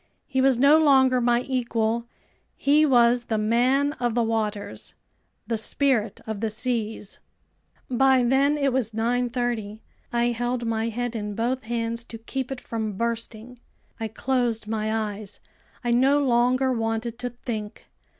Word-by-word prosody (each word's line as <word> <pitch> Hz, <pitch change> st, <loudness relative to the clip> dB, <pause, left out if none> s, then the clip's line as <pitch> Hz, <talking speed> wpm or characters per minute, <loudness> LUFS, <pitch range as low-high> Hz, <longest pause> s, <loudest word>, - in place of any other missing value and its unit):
He 265 Hz, -2 st, 0 dB
was 265 Hz, -2 st, +4 dB
no 290 Hz, +5 st, +6 dB
longer 265 Hz, -3 st, +5 dB
my 240 Hz, 0 st, +3 dB
equal, 235 Hz, -3 st, -1 dB, 0.5 s
he 300 Hz, +2 st, +3 dB
was 240 Hz, -2 st, +4 dB
the 220 Hz, -, -1 dB
Man 250 Hz, +7 st, +2 dB
of 240 Hz, -2 st, 0 dB
the 240 Hz, -, +2 dB
Waters, 215 Hz, -2 st, -3 dB, 0.5 s
the 230 Hz, -, -1 dB
Spirit 225 Hz, -3 st, 0 dB
of 220 Hz, -2 st, -4 dB
the 225 Hz, +1 st, -1 dB
Seas. 220 Hz, -2 st, -3 dB, 0.7 s
By 260 Hz, 0 st, +3 dB
then 275 Hz, +4 st, +3 dB
it 275 Hz, -3 st, +1 dB
was 240 Hz, -4 st, 0 dB
9:30. 235 Hz, -2 st, -1 dB, 0.3 s
I 235 Hz, 0 st, +1 dB
held 240 Hz, +1 st, -2 dB
my 225 Hz, 0 st, -1 dB
head 245 Hz, +1 st, -3 dB
in 210 Hz, -2 st, -4 dB
both 245 Hz, +3 st, -1 dB
hands 230 Hz, 0 st, -2 dB
to 230 Hz, -, -9 dB
keep 260 Hz, +3 st, -5 dB
it 265 Hz, -, -4 dB
from 220 Hz, -3 st, -4 dB
bursting. 230 Hz, +1 st, -4 dB, 0.4 s
I 225 Hz, -, -2 dB
closed 240 Hz, 0 st, -1 dB
my 215 Hz, 0 st, -2 dB, 0.2 s
eyes. 205 Hz, -1 st, -9 dB, 0.4 s
I 240 Hz, -, 0 dB
no 275 Hz, +4 st, +3 dB
longer 255 Hz, +1 st, +2 dB
wanted 225 Hz, 0 st, -2 dB
to 250 Hz, -, -3 dB
think. 225 Hz, -3 st, -6 dB
240 Hz, 150 wpm, -25 LUFS, 225-255 Hz, 0.7 s, no